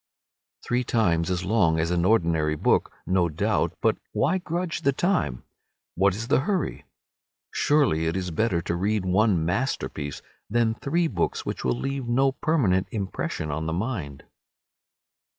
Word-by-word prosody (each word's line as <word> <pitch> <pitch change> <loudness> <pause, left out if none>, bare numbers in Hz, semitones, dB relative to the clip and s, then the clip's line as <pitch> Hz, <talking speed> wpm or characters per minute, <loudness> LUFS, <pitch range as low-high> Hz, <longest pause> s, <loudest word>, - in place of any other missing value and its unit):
Three 125 +1 +1
times 95 -9 +1
as 90 -1 -1
long 90 -6 +2
as 85 +2 0
an 90 0 +1
ordinary 80 -7 +2
book, - - +2
no 90 -2 +2
doubt, 75 - 0
but - - +2
why 180 +6 +1
grudge 175 0 -3
the 140 - +3
time? 105 - 0 0.5
What 95 +1 +2
is 110 +3 -5
the 140 - +3
hurry? 190 +6 -2 0.7
Surely 115 - +2
it 80 +3 -1
is 90 -2 -3
better 85 0 0
to 85 - -2
read 100 +2 0
one 95 -2 +2
masterpiece 90 - -2 0.3
than 115 0 +2
three 165 +9 0
books 90 - -1
which - - -4
will 60 -1 +1
leave 135 -2 -3
no 135 +3 +3
permanent 120 - +1
impression 95 -6 -3
on 80 +2 -3
the 80 - -1
mind. 90 - -4
95 Hz, 150 wpm, -25 LUFS, 85-130 Hz, 0.7 s, the